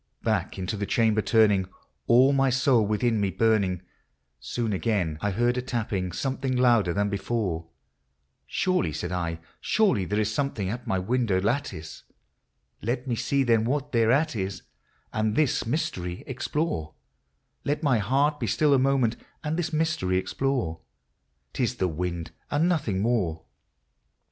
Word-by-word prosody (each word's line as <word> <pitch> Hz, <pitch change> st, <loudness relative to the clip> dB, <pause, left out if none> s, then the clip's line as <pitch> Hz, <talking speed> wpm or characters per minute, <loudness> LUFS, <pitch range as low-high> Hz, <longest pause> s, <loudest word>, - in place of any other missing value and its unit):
Back -, -, 0 dB
into 95 Hz, +2 st, -3 dB
the 100 Hz, 0 st, -3 dB
chamber 110 Hz, -2 st, +2 dB
turning, 105 Hz, -4 st, +3 dB, 0.4 s
all 130 Hz, +4 st, +6 dB
my 135 Hz, -1 st, +3 dB
soul 130 Hz, -2 st, +3 dB
within 110 Hz, +1 st, +1 dB
me 100 Hz, -, +1 dB
burning, 100 Hz, -4 st, +1 dB, 0.6 s
Soon 115 Hz, -3 st, -2 dB
again 90 Hz, -4 st, 0 dB
T 105 Hz, -, 0 dB
heard 120 Hz, +5 st, +1 dB
a -, -, -1 dB
tapping, 105 Hz, -7 st, -2 dB
something 135 Hz, +5 st, -2 dB
louder 120 Hz, -7 st, +4 dB
than 100 Hz, +3 st, +1 dB
before: 100 Hz, -5 st, -2 dB, 0.4 s
" 65 Hz, 0 st, -48 dB
Surely," 180 Hz, -, 0 dB
said 90 Hz, +5 st, -4 dB
I, 85 Hz, -2 st, -2 dB
" -, -, -34 dB
surely 190 Hz, -, +3 dB
that 105 Hz, +3 st, -1 dB
is 105 Hz, 0 st, 0 dB
something 110 Hz, -7 st, -1 dB
at 120 Hz, +2 st, -6 dB
my 95 Hz, -, +1 dB
window 105 Hz, 0 st, +1 dB
lattice; 100 Hz, -, -2 dB, 0.8 s
Let 120 Hz, +3 st, -2 dB
me 120 Hz, -, 0 dB
see 125 Hz, +4 st, +1 dB
then 115 Hz, -3 st, +3 dB
what 145 Hz, +4 st, -1 dB
thereat 125 Hz, +6 st, +3 dB
is, 95 Hz, -1 st, -3 dB, 0.5 s
and 110 Hz, 0 st, 0 dB
this 140 Hz, -5 st, +1 dB
mystery 115 Hz, -, -2 dB
explore, 130 Hz, -, -2 dB, 0.3 s
— 65 Hz, +1 st, -48 dB
Let 150 Hz, +2 st, -1 dB
my 135 Hz, -6 st, +3 dB
heart 140 Hz, +8 st, +1 dB
be -, -, -2 dB
still 150 Hz, -2 st, +3 dB
a 135 Hz, -, +5 dB
moment, 130 Hz, -3 st, +2 dB, 0.3 s
and 155 Hz, +1 st, -1 dB
this 175 Hz, 0 st, -2 dB
mystery 160 Hz, -, 0 dB
explore; 95 Hz, -4 st, -1 dB, 0.3 s
— 65 Hz, -1 st, -48 dB
'T -, -, -3 dB
is 125 Hz, 0 st, +1 dB
the 95 Hz, -6 st, 0 dB
wind, 85 Hz, 0 st, -3 dB, 0.2 s
and 150 Hz, +4 st, +2 dB
nothing 140 Hz, -, 0 dB
more." 95 Hz, -9 st, 0 dB
115 Hz, 160 wpm, -26 LUFS, 95-135 Hz, 0.8 s, all